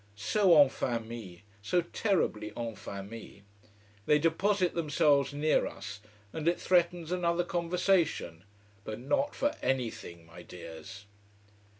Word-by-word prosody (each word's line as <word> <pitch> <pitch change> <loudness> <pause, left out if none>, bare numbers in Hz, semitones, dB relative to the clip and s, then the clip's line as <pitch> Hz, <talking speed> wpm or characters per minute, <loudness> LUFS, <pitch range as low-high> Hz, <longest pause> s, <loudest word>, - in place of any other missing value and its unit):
So 170 - +4
en 140 -2 +7
famille: 115 -8 -4 0.2
so 175 - +1
terribly 170 - -1
en 115 -1 -3
famille. 100 +1 -9 0.6
They 150 - +5
deposit 180 +4 +1
themselves 150 -3 +2
near 150 +2 +1
us, 100 +1 -8 0.3
and 160 0 -3
it 175 - +2
threatens 175 -2 +1
another 175 -1 +1
conversation. 175 - 0 0.4
But 110 +1 -6
not 275 - 0
for 290 +1 0
anything, 115 -10 -3
my 80 +1 -12
dears! 90 +3 -10
145 Hz, 115 wpm, -30 LUFS, 105-175 Hz, 0.6 s, en